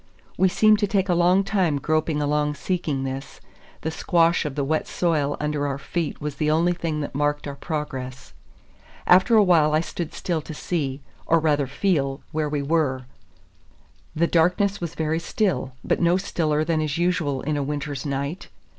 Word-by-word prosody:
We 190 - +3
seemed 215 +3 +4
to 205 - +1
take 195 -1 0
a - - +4
long 180 +3 +4
time 185 -7 +1
groping 155 +1 0
along 150 0 0
seeking 155 -6 -2
this; 135 +1 -6 0.4
the 160 - -2
squash 170 0 +2
of 145 -2 -4
the 145 - -1
wet 155 +3 -1
soil 150 -5 0
under 150 -1 -1
our 140 -1 -2
feet 165 +2 -3
was 150 -1 -5
the 150 0 +1
only 165 +3 +3
thing 165 -3 -3
that 145 - -5
marked 145 +1 -1
our 140 - -4
progress. 135 -4 -5 0.7
After 185 +6 +5
a 210 - +7
while 160 -5 +4
I - - +4
stood 170 -1 -5
still 170 -3 -2
to 155 +1 -8
see, 145 -5 -3 0.3
or 165 - +4
rather 150 -3 +1
feel, 140 -2 0
where 155 -1 -1
we 145 -1 -2
were. 140 -4 0 1.1
The 165 +2 +3
darkness 180 +4 +2
was 170 -1 -4
very 160 0 0
still, 170 - -1
but - - 0
no 170 +1 +4
stiller 155 -5 0
than 160 -1 0
is 150 -1 -2
usual 170 -6 0
in 150 +1 -1
a 145 - -1
winter's 145 0 -3
night. 140 +5 -3
155 Hz, 180 wpm, -24 LUFS, 145-175 Hz, 1.1 s, a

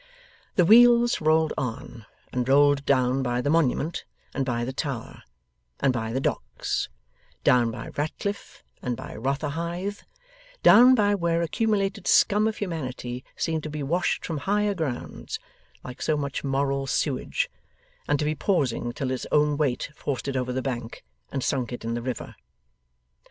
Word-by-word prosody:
The 180 - +4
wheels 240 +2 +6
rolled 155 0 +3
on, 120 -3 -5 0.3
and 125 0 -1
rolled 145 0 +4
down 130 -1 +3
by 125 -1 0
the 145 +3 0
Monument 160 0 +1 0.3
and 135 - 0
by 120 -2 -1
the 130 - -4
Tower, 135 -5 -5 0.6
and 135 -2 +2
by 115 -2 -2
the 130 - -1
Docks; - - -2 0.5
down 120 -2 +4
by 115 +1 -6
Ratcliffe, 180 +7 -4 0.2
and 125 -2 -2
by - - -8
Rotherhithe; 165 - -3 0.6
down 255 +2 +8
by 205 -3 +3
where 170 -3 +1
accumulated 200 +1 0
scum 210 +1 +4
of 220 - -2
humanity 130 -9 -4
seemed 160 -1 -1
to 155 - -6
be 150 -1 -4
washed 170 +6 0
from 160 -3 -3
higher 205 +4 +1
grounds, 155 -9 -4 0.5
like 125 -1 -9
so 155 - +1
much 140 -2 -3
moral 135 0 0
sewage, - - 0 0.6
and 145 - +2
to 150 - -1
be 155 - +1
pausing 140 - 0
until 130 +2 -3
its 130 - -3
own 150 0 +3
weight 140 -2 -1
forced 140 -3 -4
it 135 - -2
over 125 -1 -1
the 130 0 -2
bank 120 -4 -5 0.3
and 135 -2 -2
sunk 130 -4 -1
it 120 -2 -6
in 115 - -1
the 120 - -2
river. 125 0 -5
140 Hz, 160 wpm, -26 LUFS, 125-170 Hz, 0.6 s, down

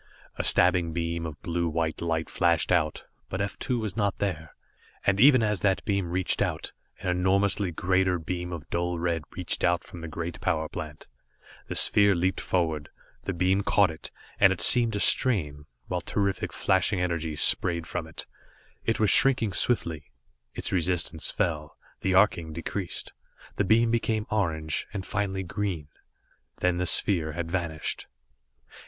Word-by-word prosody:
A - - -2
stabbing 90 -2 +5
beam 85 0 -2
of 75 -1 -8
blue 85 -1 -1
white 80 0 -2
light 80 -1 -1
flashed 85 -1 +1
out, 80 -4 +1 0.3
but 95 - -4
F 100 0 -3
2 125 - -1
was 110 -5 -4
not 100 -3 0
there, 80 -6 -4 0.5
and 100 +1 +2
even 130 -3 +7
as 105 -3 0
that 95 -2 +1
beam 100 -5 -1
reached 90 0 0
out, - - -2 0.3
an - - -2
enormously 95 +2 +1
greater 90 +2 +1
beam 90 +1 -5
of 80 -3 -7
dull 85 0 -1
red 85 -1 -1 0.2
reached 90 -2 -2
out 85 0 +2
from 85 - -11
the 85 - -6
great 85 +1 -6
power 80 0 0
plant. 75 -3 -8 0.6
The - - -5
sphere 100 -1 +5
leaped 90 +2 0
forward 80 -5 -1 0.4
the - - -1
beam 95 +3 +2
caught 100 -3 +3
it, 80 - -9 0.3
and 95 - +6
it 95 - -2
seemed 115 +5 +5
to 105 - -1
strain, 75 - +2 0.2
while 90 -1 -3
terrific 100 +2 -1
flashing 95 +1 +1
energies 80 -4 -1
sprayed 85 -1 +2
from 85 -1 -4
it. 80 - -8 0.6
It 115 - 0
was 110 -2 +3
shrinking 120 -7 +3
swiftly. 85 -10 -1 0.5
Its - - -4
resistance 85 -3 0
fell, 75 -3 -2 0.2
the 95 -1 0
arcing 85 -5 +3
decreased; 85 +3 -5 0.4
the - - +2
beam 115 +4 +3
became 110 -2 0
orange 80 -6 -1
and 95 -2 -4
finally 100 -2 -2
green. 90 -5 -4 0.7
Then 90 -1 +1
the 90 - -1
sphere 80 -6 +1
had 85 0 -4
vanished. 85 -4 -3
90 Hz, 160 wpm, -27 LUFS, 80-100 Hz, 0.7 s, even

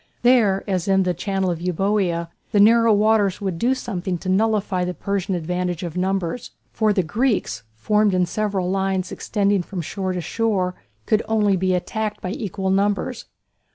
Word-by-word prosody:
There, 225 -6 +4
as 185 -3 -1
in 195 -1 +3
the 180 -1 0
channel 190 +1 -1
of 170 -1 -4
Euboea, 180 -1 0 0.2
the 205 - +4
narrow 230 +2 +6
waters 210 -2 +3
would 190 -4 -3
do 250 +6 +2
something 185 -7 -3
to 185 +2 -6
nullify 205 -2 +1
the 180 0 -3
Persian 195 -1 -2
advantage 180 +1 -2
of 170 -2 -5
numbers. 190 +5 -2 0.2
For 215 -1 +1
the 195 -3 +1
Greeks, 205 - 0
formed 210 - +2
in 180 -1 +3
several 200 -1 -1
lines 190 -1 -1
extending 200 -2 0
from 180 0 -5
shore 185 +3 -3
to 180 - -3
shore, 190 0 0 0.3
could 215 0 +2
only 210 -3 +2
be 185 0 +1
attacked 215 +4 -3
by 185 - -4
equal 195 -2 -3
numbers. 205 +5 0
195 Hz, 170 wpm, -22 LUFS, 180-210 Hz, 0.3 s, narrow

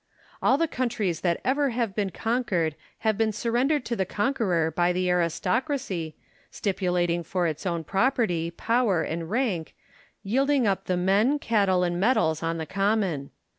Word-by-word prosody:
All 265 - +4
the 330 +2 +1
countries 225 - -2
that 170 -2 +1
ever 280 +2 +2
have 230 -5 -2
been 205 -2 0
conquered 215 -8 -1 0.3
have 215 -1 +2
been 220 -1 +2
surrendered 245 +6 0
to 235 - -2
the 195 - +1
conqueror 190 -6 0
by 175 +2 +2
the 180 0 0
aristocracy, 180 - -1 0.3
stipulating 180 -3 0
for 175 +2 -1
its 160 +3 -2
own 170 -2 -1
property, 195 - +1
power, 205 -1 +1
and 165 0 -4
rank, 210 -8 -1 0.5
yielding 270 +5 +2
up 195 -2 0
the 180 - 0
men, 200 +10 +3
cattle, 200 -8 +2
and 175 0 -1
metals 195 -8 +2
on 165 0 -1
the 160 - -4
common. 195 -6 0
195 Hz, 155 wpm, -26 LUFS, 175-235 Hz, 0.5 s, All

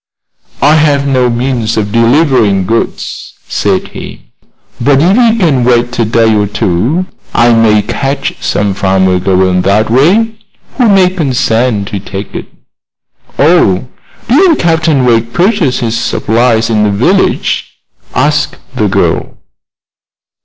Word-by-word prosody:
"I 150 +3 +4
have 145 -2 +1
no 130 -2 +1
means 120 -2 -2
of 105 -1 -2
delivering 115 - +2
goods," 115 +4 -4
said - - -1
he; - - -11 0.5
"but 135 +2 +3
if 180 +6 +3
you 230 -2 +3
can 155 - +1
wait 120 0 0
a 115 - +2
day 115 0 +2
or 105 -1 +1
two 110 - -1 0.3
I 120 0 +4
may 110 -2 +3
catch 135 +6 -3
some 100 -1 -1
farmer 95 -1 +1
going 95 0 +1
that 105 +4 +1
way 205 - +2 0.4
who 245 - +3
will 190 -2 +4
consent 125 - -1
to 100 - -4
take 100 +1 -8
it." - - -6 0.9
"Oh. 130 - +2 0.4
Didn't 320 +7 +4
Captain 160 -5 +1
Wegg 115 -1 +1
purchase 175 - 0
his 115 -1 -2
supplies 115 0 0
in 110 -1 +1
the 105 - +2
village?" 130 - 0 0.4
asked - - 0 0.2
the - - 0
girl. - - -1
120 Hz, 130 wpm, -10 LUFS, 105-155 Hz, 0.9 s, I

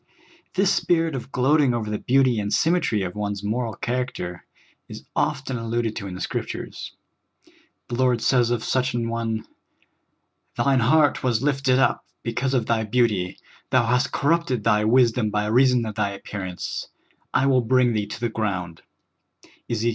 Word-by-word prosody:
This 195 0 +3
spirit 165 -2 +1
of 135 0 -6
gloating 135 0 +3
over 110 -2 -3
the 105 - -2
beauty 130 -3 +3
and 105 0 -3
symmetry 160 - +2
of 90 -1 -4
one's 100 -1 -3
moral 115 +1 -2
character 120 -9 -3 0.5
is - - -9
often 130 -1 -1
alluded 115 -1 -2
to 100 - -5
in 90 - -6
the 95 - -7
Scriptures. - - -5 0.9
The 120 - -4
Lord 125 -1 +2
says 120 0 +2
of 120 -2 -1
such 130 -1 0
an 115 -1 -1
one: 115 -1 -2 0.4
' - - -48
' - - -38
Thine 130 +2 +3
heart 145 +4 +3
was 120 -1 0
lifted 135 -3 +2
up; 135 - +2 0.2
because 125 +3 -1
of 120 -3 +1
thj^ 110 -2 0
beauty 105 -6 +1 0.3
thou 130 -2 +3
hast 125 +2 +1
corrupted 145 -6 +1
thy 105 -1 +3
wisdom 120 -1 +3
by 105 0 -1
reason 125 +2 +3
of 110 - -4
thy 100 0 -1
ap 100 - -13
pearance; 95 -3 -5 0.4
I 135 - +2
will 130 -2 +4
bring 125 0 +3
thee 105 -2 -1
to 105 - -7
the 120 0 -1
ground" 95 -7 -3 0.9
(Bzek. 115 0 0
120 Hz, 170 wpm, -23 LUFS, 105-130 Hz, 0.9 s, will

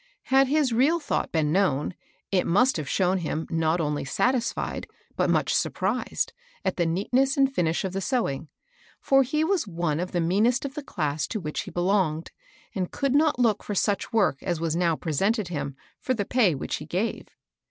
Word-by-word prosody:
Had 270 0 +6
his 285 -3 +2
real 285 +9 +3
thought 295 - -2
been 155 -2 +1
known, 175 -4 +1 0.4
it 185 -2 +2
must 245 +9 +3
have 150 -3 -4
shown 185 0 +2
him 160 -1 -3
not 165 +1 +1
only 150 -2 -1
satisfied, 245 - -1 0.3
but - - +1
much - - +2
surprised, - - -1 0.3
at - - 0
the 170 -2 +1
neatness 250 +11 +1
and 270 -1 +3
finish 165 -9 0
of 190 - -3
the 195 - -2
sewing; 160 - -1 0.5
for 270 0 +4
he 300 +4 0
was 340 - +1
one 165 -4 -1
of 180 +1 -3
the 175 - 0
mean 185 +7 +3
est 250 +3 0
of 270 - -10
the 300 - -5
class 155 - -2
to 215 - -3
which 150 -5 -4
he - - -8
belonged, 175 -3 0 0.4
and 185 -4 -2
could 275 -2 -1
not 300 0 +3
look 230 -4 +2
for 205 - -4
such 200 +4 0
work 210 - +2
as 175 -4 -2
was 165 -1 -1
now 170 -2 +2
presented 195 - 0
him 140 -4 -4 0.2
for 255 - -1
the 205 -3 -2
pay 210 - +3
which 135 - -3
he - - -8
gave. 190 +7 -2
190 Hz, 195 wpm, -26 LUFS, 165-250 Hz, 0.5 s, Had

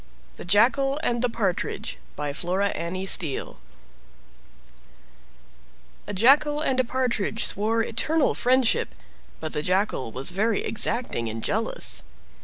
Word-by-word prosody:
THE - - -9
JACKAL 265 - +3
AND 240 -1 0
THE 250 - +1
PARTRIDGE 205 -6 -3 0.2
By 145 -1 -3
Flora 185 +6 -1
Annie 185 +2 -4
Steel 165 -7 +1 2.5
A - - -4
jackal 285 +8 +4
and 270 -4 0
a - - +4
partridge 235 -3 -1
swore 225 +3 +3
eternal 300 +8 +1
friendship; 255 -1 +1 0.4
but 155 -1 -6
the 150 - -1
Jackal 185 - -1
was 130 +8 -3
very 210 +3 0
exacting 220 - 0
and 115 +1 -6
jealous. - - -1
215 Hz, 120 wpm, -25 LUFS, 180-250 Hz, 2.5 s, jackal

